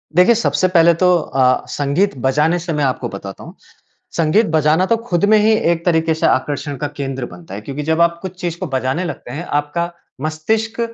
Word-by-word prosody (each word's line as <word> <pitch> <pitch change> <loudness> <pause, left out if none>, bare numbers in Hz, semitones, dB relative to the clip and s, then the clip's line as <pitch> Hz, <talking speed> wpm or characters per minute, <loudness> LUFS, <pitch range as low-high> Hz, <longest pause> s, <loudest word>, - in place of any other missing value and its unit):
देखिए 180 +7 +6
सबसे 190 -4 +1
पहले 170 -2 +5
तो 180 +2 +3
अ, 130 -5 +1
संगीत 145 +4 0
बजाने 150 +6 +2
से 170 -1 -4
मैं 150 - 0
आपको 130 -2 -1
बताता 100 -1 -8
हूँ। - - -11 0.6
संगीत 165 +8 +3
बजाना 155 +4 +3
तो 230 - +2
ख़ुद 175 +2 +2
में 215 - +6
ही 215 +1 +4 0.2
एक 170 -1 -2
तरीके 165 -2 +2
से 160 - -1
आकर्षण 145 +2 -1
का 145 +3 -2
केंद्र 135 -2 -3
बनता 90 +1 -12
है 105 - -6
क्योंकि 140 +6 -5
जब 160 +2 +1
आप 170 0 +2
कुछ 185 -1 -8
चीज़ 175 -1 -3
को 185 - -3
बजाने 130 +5 -1
लगते 140 -6 -7
हैं, 160 +6 -5
आपका 150 +4 -2 0.3
मस्तिष्क 220 +10 -2
160 Hz, 205 wpm, -18 LUFS, 140-175 Hz, 0.6 s, देखिए